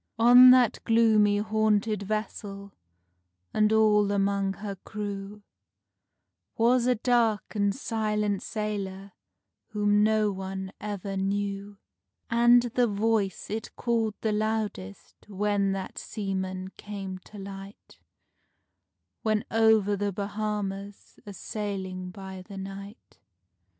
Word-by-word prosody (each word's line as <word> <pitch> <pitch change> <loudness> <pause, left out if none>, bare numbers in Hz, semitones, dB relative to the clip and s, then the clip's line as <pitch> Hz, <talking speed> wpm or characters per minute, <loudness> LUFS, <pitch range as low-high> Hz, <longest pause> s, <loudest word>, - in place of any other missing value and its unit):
On 245 +2 +9
that 250 -2 +5
gloomy 220 -3 +4
haunted 215 0 +1
vessel, 200 -1 -5 0.8
and 215 0 +3
all 210 -2 +4
among 200 -1 +1
her 200 0 -6
crew, 205 0 -6 1.1
Was 240 +2 +3
a 250 - +3
dark 230 -2 +1
and 200 -2 +1
silent 210 -5 -1
sailor 200 -2 -4 0.6
whom 205 -1 +2
no 215 -1 +2
one 190 0 -5
ever 205 -2 -4
knew; 200 +1 -2 0.5
And 240 +1 +6
the 245 0 +1
Voice 210 -2 -1
it 220 +1 -5
called 225 -3 0
the 220 - 0
loudest 210 - -3
when 200 0 0
that 190 -1 -5
seaman 190 -2 -4
came 195 -2 -6
to 210 - -13
light, 195 0 -10 1.2
When 215 -1 0
over 220 -2 +4
the 205 0 -1
Bahamas 200 0 -5
a 205 - -7
sailing 190 -3 -5
by 190 0 -9
the 195 +1 -11
night. 195 +2 -9
205 Hz, 110 wpm, -27 LUFS, 195-220 Hz, 1.2 s, On